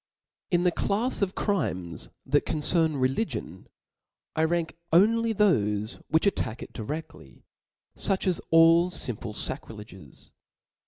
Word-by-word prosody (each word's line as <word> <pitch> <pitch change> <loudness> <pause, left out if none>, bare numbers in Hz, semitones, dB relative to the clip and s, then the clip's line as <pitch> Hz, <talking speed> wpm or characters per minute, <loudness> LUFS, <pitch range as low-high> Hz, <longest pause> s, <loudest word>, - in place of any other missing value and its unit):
In 175 -1 +2
the 180 - +3
clafs 210 +9 -1
of 195 -1 0
crimes 90 - -2 0.2
that 145 +2 +2
concern 160 0 +1
religion, 130 - -2 0.7
I 160 - +2
rank 165 0 -1 0.2
only 225 +6 +4
thofe 110 - +1
which 160 +4 +2
attack 125 - -1
it - - -12
diredly, 120 - -7 0.5
foch 190 - -1
as 185 -3 0
all 165 +2 +6
fimple 115 - -3
facrileges. 100 -12 -8
160 Hz, 115 wpm, -27 LUFS, 110-185 Hz, 0.7 s, all